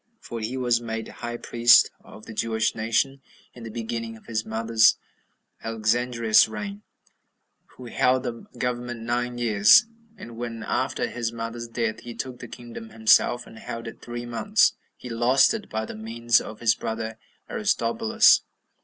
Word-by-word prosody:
For 115 - -7
he 115 +4 -4
was 120 -2 +1
made 115 -1 -4
high 120 0 -6
priest 120 0 +5
of 110 - -14
the 115 - -9
Jewish 110 0 0
nation 115 +5 0 0.3
in 120 - -13
the 115 - -7
beginning 115 0 -5
of - - -21
his 110 -1 -2
mother 115 +1 -5 0.9
Alexandra's 115 0 +2
reign, 105 -1 -6 0.9
who 125 - -11
held 125 +2 +1
the 120 -2 -6
government 120 -2 -3
nine 120 +1 -2
years; 110 - +6 0.3
and 115 - -10
when, 115 -2 -5
after - - -1
his 115 -2 -3
mother's 115 0 -6
death, 115 -1 -2
he 120 -1 -9
took 125 +1 -6
the 120 - -8
kingdom 115 -2 -10
himself, 115 +2 +3
and 115 - -13
held 115 +1 -7
it 115 - -10
three 120 0 -6
months, 200 - +2 0.2
he - - -10
lost 125 - +3
it, 220 -2 -6
by 110 0 -3
the - - -8
means 115 +2 +1
of 110 +1 -9
his 115 -1 +4
brother 110 0 -5 0.3
Aristobulus. 225 +1 +3
115 Hz, 160 wpm, -25 LUFS, 110-120 Hz, 0.9 s, years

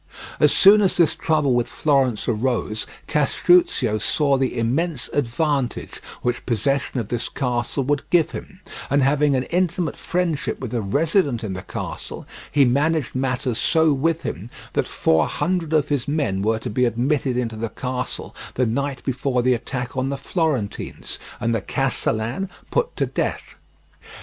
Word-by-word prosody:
As 150 - +5
soon 205 +2 +7
as 195 - +2
this 170 -3 +4
trouble 155 -5 +1
with 120 -1 +1
Florence 135 -7 +1
arose, 110 -2 -1 0.2
Castruccio 150 -6 +3
saw 140 +6 +2
the 130 -2 -1
immense 135 +5 0
advantage 140 0 -1 0.2
which 120 0 -1
possession 135 +2 0
of 110 -3 -4
this 120 -2 -2
castle 125 +1 -1
would 145 +2 -1
give 170 -3 +3
him, - - -9 0.3
and 140 0 +3
having 145 +1 +3
an 130 - +1
intimate 175 -1 0
friendship 175 -4 -1
with 125 -3 -5
a 120 - 0
resident 145 - +1
in 100 -3 -3
the 90 - -5
castle, - - -6 0.3
he 145 -2 +5
managed 145 +3 +1
matters 130 -2 -1
so 160 -2 +3
with 165 +4 0
him 95 +10 -5 0.2
that - - 0
four 80 0 +2
hundred 175 -3 -1
of 155 -2 +2
his 145 -4 -1
men 140 -11 0
were 110 +2 +1
to 110 - -5
be 125 +4 +2
admitted 125 +2 0
into 115 -3 -2
the 110 +1 -3
castle 125 +1 -4 0.2
the 125 - +2
night 130 +3 -2
before 125 -1 0
the 130 0 +4
attack 125 +1 -4
on 130 +1 0
the 140 - -2
Florentines, 140 - -2 0.2
and 115 -1 0
the 115 - 0
castellan 130 - -1 0.2
put 485 -1 0
to - - +1
death. - - -3
135 Hz, 160 wpm, -22 LUFS, 120-150 Hz, 0.3 s, soon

